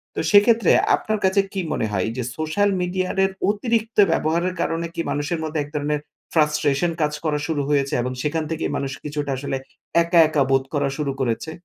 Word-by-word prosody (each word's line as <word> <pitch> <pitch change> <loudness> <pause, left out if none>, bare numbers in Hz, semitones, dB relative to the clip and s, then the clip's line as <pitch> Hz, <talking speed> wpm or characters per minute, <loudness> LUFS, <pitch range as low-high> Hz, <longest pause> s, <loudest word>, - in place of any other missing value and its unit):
তো - - -2
সেক্ষেত্রে 210 0 +5 0.2
আপনার 215 -1 -2
কাছে 190 +1 +4
কী 195 - -1
মনে - - 0
হয়? 95 -3 0
এইযে 125 +2 -4
সোশ্যাল 155 +6 +1
মিডিয়ার 185 +2 0 0.2
অতিরিক্ত 225 +1 -1
ব্যবহারের 170 +3 0
কারণে 165 +1 -1
কি - - -1
মানুষের 150 +3 -2
মধ্যে 155 0 -2
এক 145 - -6
ধরনের 150 0 0 0.3
ফ্রাস্ট্রেশন 150 +1 +2
কাজ 150 0 +1
করা 150 -1 +1
শুরু 155 -3 -1
হয়েছে? 140 -2 +1
এবং 125 +1 -2
সেখান 160 +2 -1
থেকেই 160 - -2
মানুষ 135 -1 -3
কিছুটা 145 -1 -3
আসলে 135 0 -3 0.5
একা, 170 0 +3
একা 150 -2 +2
বোধ 135 0 +3
করা 145 -1 +1
শুরু 145 -2 -1
করেছে? 130 +5 -1
155 Hz, 180 wpm, -22 LUFS, 145-185 Hz, 0.5 s, সেক্ষেত্রে